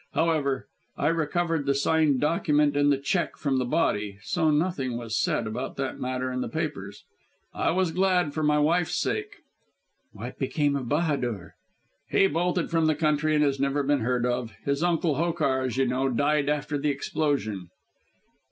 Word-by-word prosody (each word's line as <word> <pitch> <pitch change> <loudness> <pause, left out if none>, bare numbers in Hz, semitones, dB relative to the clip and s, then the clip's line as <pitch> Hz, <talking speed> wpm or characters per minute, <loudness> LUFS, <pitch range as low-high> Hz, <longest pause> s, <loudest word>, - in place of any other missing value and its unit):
However, 150 -5 0 0.3
I 145 - +1
recovered 165 -1 0
the 140 - +2
signed 145 -1 +2
document 150 -1 +2
and 145 0 +3
the 140 - +3
cheque 170 +6 -1
from 135 -3 0
the 125 - 0
body, 105 -8 0
so 160 - +1
nothing 150 -6 0
was 115 -2 -4
said - - 0
about 115 +4 -4
that 135 -1 -4
matter 130 0 -2
in 125 0 -2
the - - -3
papers. - - -4 0.5
I - - 0
was 185 -1 +1
glad 180 -3 +1
for 155 - -2
my 150 0 +3
wife's 160 +3 +2
sake." 415 -1 -3 0.7
"What - - -8
became 145 -2 0
of 130 -4 -3
Bahadur?" 135 - -1 0.6
"He - - +4
bolted 175 0 0
from 165 -1 +2
the 155 - +2
country 155 0 +1
and 150 - +3
has 140 -2 +1
never 140 +1 +1
been 145 0 +2
heard 125 +1 0
of. 120 -2 -2
His 140 +1 0
uncle, 170 -4 +1
Hokar, 155 -5 +1
as 130 -2 -2
you 135 - +3
know, 130 +2 0
died 145 +3 +1
after 145 0 -1
the 150 +1 0
explosion." 135 - -2
145 Hz, 175 wpm, -26 LUFS, 130-160 Hz, 0.7 s, He